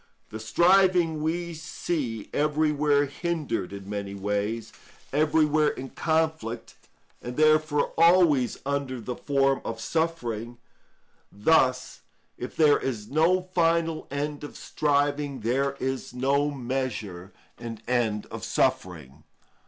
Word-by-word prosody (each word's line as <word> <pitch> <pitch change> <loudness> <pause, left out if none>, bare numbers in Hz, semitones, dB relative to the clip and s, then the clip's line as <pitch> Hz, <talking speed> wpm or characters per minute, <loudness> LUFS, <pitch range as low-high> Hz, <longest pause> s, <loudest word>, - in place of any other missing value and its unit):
The 110 - -6
striving 175 - +3
we 170 +2 -2
see 150 -7 -4
everywhere 150 -1 +2
hindered 145 - -3
in 100 -1 -8
many 100 -1 -5
ways, 105 +3 -2 0.4
everywhere 155 0 +3
in 130 -2 -4
conflict, 160 -8 -1 0.5
and 125 0 -7
therefore 155 -1 +3
always 165 - +4
under 140 -2 -2
the 120 +2 -5
form 135 -1 +1
of 115 0 -5
suffering. 120 -7 -2 0.7
Thus, 130 +3 +2 0.3
if 125 - -7
there 150 -2 +5
is 110 -6 -4
no 165 +5 +3
final 165 -2 +1
end 145 +1 -3
of 145 - -8
striving, 145 -2 0
there 135 +5 0
is 130 -1 -3
no 140 +3 +1
measure 120 -9 -4 0.3
and 115 -2 -7
end 115 -4 0
of - - -7
suffering. 75 -5 -1
140 Hz, 115 wpm, -26 LUFS, 115-155 Hz, 0.7 s, there